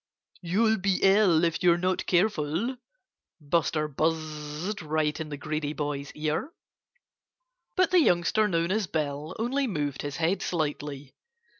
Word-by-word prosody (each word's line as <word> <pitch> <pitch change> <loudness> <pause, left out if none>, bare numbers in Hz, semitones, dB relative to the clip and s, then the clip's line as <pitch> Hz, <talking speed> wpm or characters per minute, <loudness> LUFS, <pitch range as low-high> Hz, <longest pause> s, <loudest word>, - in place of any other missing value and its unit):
"You'll 220 +5 +2
be 190 0 +1
ill, 195 -4 +5
if 165 -1 +1
you're 175 -1 +5
not 185 +1 -1
careful," 180 - +1 0.6
Buster 155 0 0
buzzed 155 +4 -2
right 155 -1 -1
in 160 -1 -5
the 145 - -5
greedy 150 0 -3
boy's 145 -2 -4
ear. 155 - -2 1.3
But 370 -1 +3
the 365 - +6
youngster 210 - +3
known 170 -2 0
as 210 -1 0
Bill 150 -1 -3
only 265 +5 0
moved 145 - -2
his 145 -1 -5
head 170 +4 +1
slightly. 145 -4 -3
165 Hz, 135 wpm, -27 LUFS, 150-195 Hz, 1.3 s, the